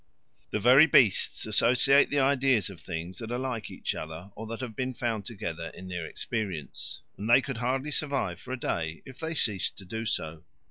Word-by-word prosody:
The - - -1
very 130 +8 +7
beasts 120 - +4
associate 135 +4 +5
the 145 - -1
ideas 135 -6 +3
of 95 - -12
things 85 +1 -5
that 115 -1 -6
are 120 - -1
like 125 -3 -3
each - - -3
other 80 +5 -7
or 110 +1 -7
that 115 +2 -5
have 120 -4 -5
been 130 +1 -2
found 110 -4 -2
together 85 -7 -5
in 95 0 -9
their 90 -3 -4
experience; 95 -9 -4 0.2
and 105 +3 -3
they 120 - +8
could 135 -2 -4
hardly 130 +5 -1
survive 140 - -1
for 125 - -9
a 130 - -3
day 80 -6 -3
if 135 -1 -12
they 160 0 -3
ceased 105 -9 0
to 95 - -10
do 110 +4 -4
so. 80 -3 -2
115 Hz, 200 wpm, -28 LUFS, 95-130 Hz, 0.2 s, they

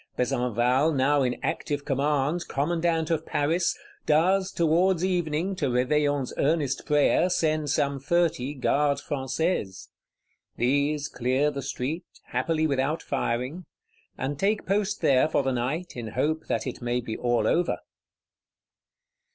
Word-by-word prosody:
Besenval, 125 +3 +1
now 140 +2 +3
in 125 -2 0
active 145 -3 -2
command, 145 +3 0
Commandant 165 +2 0
of 160 -1 0
Paris, 165 +4 0 0.3
does, 185 +5 +3
towards 170 +2 +2
evening, 175 0 -1
to 145 -6 0
Réveillon's 140 +2 +1
earnest 145 -2 0
prayer, 150 +4 +3
send 155 -4 0
some 140 +1 0
thirty 150 -2 0
Gardes 140 +2 +1
Françaises. 135 - -2 0.7
These 145 +4 +1
clear 130 +4 0
the 140 -1 -5
street, 140 +4 -3 0.3
happily 160 -1 0
without 140 +2 0
firing; 135 +6 -2 0.5
and 135 +2 -3
take 205 +3 +1
post 205 +1 0
there 135 +1 +4
for 145 - +1
the 135 - 0
night 135 +9 -3
in 120 -2 -5
hope 150 +8 -1
that - - -1
it 130 - -5
may 120 0 0
be 115 -2 -5
all 120 -1 +1
over. 175 +1 +1
145 Hz, 130 wpm, -26 LUFS, 130-165 Hz, 0.7 s, there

